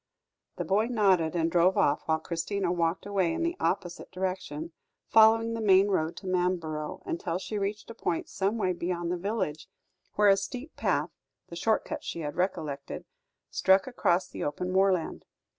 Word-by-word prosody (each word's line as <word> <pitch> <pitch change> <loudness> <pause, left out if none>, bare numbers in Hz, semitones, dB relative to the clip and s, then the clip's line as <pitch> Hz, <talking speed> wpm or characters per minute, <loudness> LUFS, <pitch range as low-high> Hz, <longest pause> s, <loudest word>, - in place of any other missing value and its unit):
The - - -3
boy 210 +4 +2
nodded 190 -9 +2
and 165 -1 +1
drove 180 +2 +4
off, 145 - +2
whilst 160 0 +1
Christina 175 +2 -2
walked 170 0 0
away 195 -4 +1
in 335 - -2
the 340 +1 0
opposite 175 -2 -2
direction, 185 -4 -4 0.4
following 225 +1 +5
the 230 - -3
main 195 -1 +5
road 165 -4 0
to - - -9
Manborough, 175 -4 -1
until 170 0 -2
she 205 +3 -4
reached 205 +1 -3
a - - -7
point 175 -6 -2
some 200 +3 -1
way 185 -4 +1
beyond 175 0 -2
the - - +1
village, 185 -5 -3 0.5
where 210 -1 +5
a 195 - +6
steep 250 +9 -6
path - - 0 0.4
the 170 - -8
short 220 +6 +1
cut - - -5
she 170 - -5
had 150 -1 -4
recollected 160 -6 -3 0.5
struck 190 0 +4
across 185 -8 +1
the - - -6
open 180 +5 -2
moorland. 190 -3 +1
185 Hz, 175 wpm, -28 LUFS, 170-200 Hz, 0.5 s, a